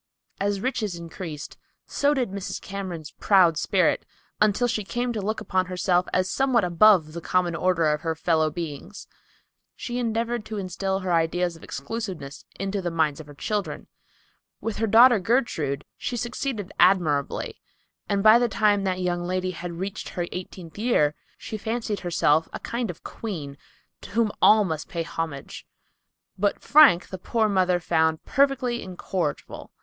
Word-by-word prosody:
As 200 Hz, 0 st, -1 dB
riches 220 Hz, -7 st, -2 dB
increased, 165 Hz, -2 st, -8 dB, 0.3 s
so 285 Hz, +1 st, +1 dB
did 250 Hz, -7 st, -1 dB
Mrs. 200 Hz, -1 st, -5 dB
Cameron's 185 Hz, -6 st, -6 dB
proud 185 Hz, -5 st, +5 dB
spirit, -, -, +1 dB, 0.4 s
until 215 Hz, +3 st, +3 dB
she 220 Hz, -3 st, -1 dB
came 240 Hz, +4 st, -2 dB
to 215 Hz, -, -3 dB
look 215 Hz, +3 st, -2 dB
upon 185 Hz, -1 st, 0 dB
herself 180 Hz, 0 st, +1 dB
as 185 Hz, 0 st, +1 dB
somewhat 255 Hz, +2 st, +2 dB
above 175 Hz, -2 st, +4 dB
the 170 Hz, -, -6 dB
common 175 Hz, 0 st, 0 dB
order 180 Hz, -1 st, +1 dB
of 150 Hz, -, -3 dB
her 165 Hz, -1 st, -2 dB
fellow 160 Hz, -1 st, +1 dB
beings. 165 Hz, +3 st, -7 dB, 0.7 s
She 245 Hz, 0 st, -4 dB
endeavored 230 Hz, 0 st, -1 dB
to 215 Hz, -, -5 dB
instil 190 Hz, 0 st, -2 dB
her 185 Hz, -1 st, -1 dB
ideas 170 Hz, +1 st, +1 dB
of 165 Hz, -, -15 dB
exclusiveness 175 Hz, -3 st, -6 dB
into 195 Hz, +1 st, -2 dB
the 175 Hz, -, -2 dB
minds 160 Hz, -3 st, 0 dB
of 155 Hz, -, -10 dB
her 145 Hz, -, -12 dB
children. 205 Hz, +7 st, -3 dB, 0.7 s
With 225 Hz, -2 st, -4 dB
her 225 Hz, -, 0 dB
daughter 235 Hz, +2 st, +7 dB
Gertrude, 180 Hz, -, 0 dB
she 245 Hz, -, -3 dB
succeeded 235 Hz, -4 st, -3 dB
admirably, 155 Hz, -7 st, +2 dB, 0.5 s
and 200 Hz, -1 st, +1 dB
by 220 Hz, +2 st, +8 dB
the 240 Hz, -1 st, +1 dB
time 205 Hz, -1 st, +2 dB
that 185 Hz, -1 st, -1 dB
young 175 Hz, -1 st, -1 dB
lady 185 Hz, +1 st, -2 dB
had 175 Hz, 0 st, -6 dB
reached 190 Hz, +4 st, -5 dB
her 175 Hz, -, -3 dB
eighteenth 180 Hz, -1 st, -8 dB
year, 210 Hz, -11 st, +2 dB, 0.2 s
she 215 Hz, -, -6 dB
fancied 220 Hz, -1 st, -2 dB
herself 165 Hz, -3 st, +2 dB
a -, -, -6 dB
kind 235 Hz, -1 st, -3 dB
of 175 Hz, 0 st, -8 dB
queen 160 Hz, -11 st, -6 dB, 0.5 s
to -, -, -10 dB
whom 220 Hz, +1 st, +1 dB
all 215 Hz, 0 st, +7 dB
must 160 Hz, -5 st, -4 dB
pay 170 Hz, -1 st, -2 dB
homage. 160 Hz, -4 st, -6 dB, 0.7 s
But 205 Hz, +1 st, 0 dB
Frank 285 Hz, -, +6 dB
the 185 Hz, -, -7 dB
poor 220 Hz, +4 st, +1 dB
mother 185 Hz, -3 st, +2 dB
found 160 Hz, -2 st, +1 dB
perfectly 260 Hz, -3 st, +1 dB
incorrigible. 180 Hz, -4 st, -4 dB
185 Hz, 160 wpm, -25 LUFS, 170-220 Hz, 0.7 s, by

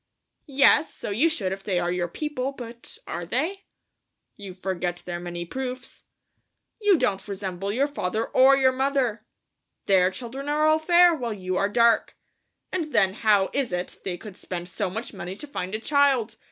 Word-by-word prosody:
"Yes, 280 Hz, +2 st, +4 dB
so -, -, -6 dB
you 265 Hz, +12 st, +3 dB
should 200 Hz, -, -2 dB
if 195 Hz, 0 st, -5 dB
they 190 Hz, -3 st, 0 dB
are 175 Hz, 0 st, -1 dB
your 175 Hz, -1 st, -1 dB
people, 275 Hz, -, -3 dB
but... 235 Hz, -2 st, -9 dB
are 175 Hz, -, -4 dB
they?" 315 Hz, -, -2 dB, 0.7 s
"You 195 Hz, -3 st, -9 dB
forget 180 Hz, -2 st, -3 dB
their 175 Hz, -1 st, -4 dB
many 175 Hz, 0 st, -5 dB
proofs." 255 Hz, +5 st, -6 dB, 0.8 s
"You 410 Hz, -3 st, +5 dB
don't 210 Hz, -9 st, -1 dB
resemble 195 Hz, -1 st, -4 dB
your 260 Hz, +6 st, +2 dB
father 225 Hz, -6 st, -2 dB
or 270 Hz, +1 st, +5 dB
your 260 Hz, -1 st, +4 dB
mother. 260 Hz, -4 st, -1 dB, 0.6 s
Their 185 Hz, -2 st, +4 dB
children 255 Hz, +7 st, -6 dB
are 300 Hz, +1 st, +2 dB
all 310 Hz, 0 st, +4 dB
fair, 345 Hz, +2 st, +6 dB
while 240 Hz, -8 st, -3 dB
you 185 Hz, -2 st, -3 dB
are 200 Hz, +2 st, +1 dB
dark. 235 Hz, +1 st, +3 dB, 0.5 s
And 330 Hz, -5 st, -2 dB
then 195 Hz, -3 st, +4 dB
how 205 Hz, -3 st, +2 dB
is 270 Hz, -6 st, 0 dB
it 180 Hz, 0 st, -4 dB
they 180 Hz, -2 st, -3 dB
could 205 Hz, 0 st, -11 dB
spend 175 Hz, -3 st, -6 dB
so 195 Hz, +1 st, -2 dB
much 225 Hz, +6 st, -6 dB
money 190 Hz, -1 st, -6 dB
to 295 Hz, -, -9 dB
find 195 Hz, -9 st, -4 dB
a -, -, -2 dB
child? 265 Hz, -4 st, +2 dB
225 Hz, 180 wpm, -25 LUFS, 185-275 Hz, 0.8 s, fair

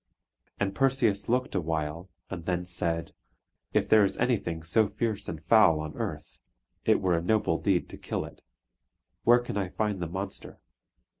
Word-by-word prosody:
And 100 Hz, -1 st, 0 dB
Perseus 120 Hz, -5 st, +1 dB
looked 125 Hz, +2 st, +1 dB
awhile, 80 Hz, 0 st, -2 dB, 0.2 s
and 85 Hz, -4 st, -6 dB
then 90 Hz, 0 st, -1 dB
said: 85 Hz, -2 st, -2 dB, 0.6 s
"If -, -, +1 dB
there 110 Hz, -1 st, +6 dB
is 100 Hz, -, 0 dB
anything 100 Hz, -10 st, 0 dB
so 105 Hz, +7 st, +3 dB
fierce 110 Hz, +1 st, -2 dB
and 80 Hz, -2 st, -6 dB
foul 90 Hz, -6 st, +6 dB
on 75 Hz, -1 st, -5 dB
earth, -, -, -5 dB, 0.5 s
it -, -, +4 dB
were 90 Hz, -2 st, +1 dB
a 85 Hz, -, 0 dB
noble 90 Hz, -3 st, +1 dB
deed 95 Hz, -3 st, +1 dB
to -, -, -9 dB
kill -, -, -3 dB
it. -, -, -13 dB, 0.8 s
Where 120 Hz, +1 st, +7 dB
can 120 Hz, -4 st, -4 dB
I 95 Hz, -2 st, -1 dB
find 105 Hz, 0 st, -1 dB
the 85 Hz, -, -2 dB
monster?" 95 Hz, +3 st, -6 dB
95 Hz, 165 wpm, -28 LUFS, 85-110 Hz, 0.8 s, Where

